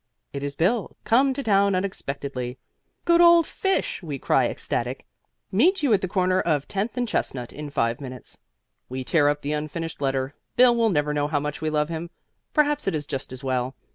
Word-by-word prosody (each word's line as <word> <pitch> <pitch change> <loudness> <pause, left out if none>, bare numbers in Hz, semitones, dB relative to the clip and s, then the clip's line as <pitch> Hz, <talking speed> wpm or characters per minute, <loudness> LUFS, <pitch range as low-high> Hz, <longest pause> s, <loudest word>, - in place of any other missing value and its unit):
It 140 - -4
is 140 0 -4
Bill, 200 - 0
come 265 +4 +4
to 280 - -3
town 200 -3 +3
unexpectedly. 140 -9 -4 0.5
"Good 340 0 +5
old 340 -1 +7
fish!" 385 - -1
we 150 -6 -5
cry, - - +2
ecstatic. - - -3 0.5
"Meet 320 - +3
you 265 -6 +4
at 200 - +3
the 185 - -1
corner 185 0 +2
of 150 -4 0
Tenth 205 +5 -2
and 245 -1 0
Chestnut 125 - -2
in 150 0 -6
five 115 -2 0
minutes." 130 -2 -8 0.5
We 130 +1 -4
tear 145 +2 +3
up 145 0 -2
the 145 +2 -1
unfinished 155 +1 -4
letter. 135 0 -1 0.2
Bill 245 -1 +6
will 230 -1 +3
never 150 -5 +1
know 145 0 0
how 150 -1 0
much 150 +1 -4
we 155 - 0
love 150 0 0
him. 165 +1 -4 0.4
Perhaps 295 -3 +1
it 195 - +1
is 150 -1 -3
just 135 -1 -4
as 130 +1 -8
well. 130 0 -1
155 Hz, 200 wpm, -24 LUFS, 140-215 Hz, 0.5 s, old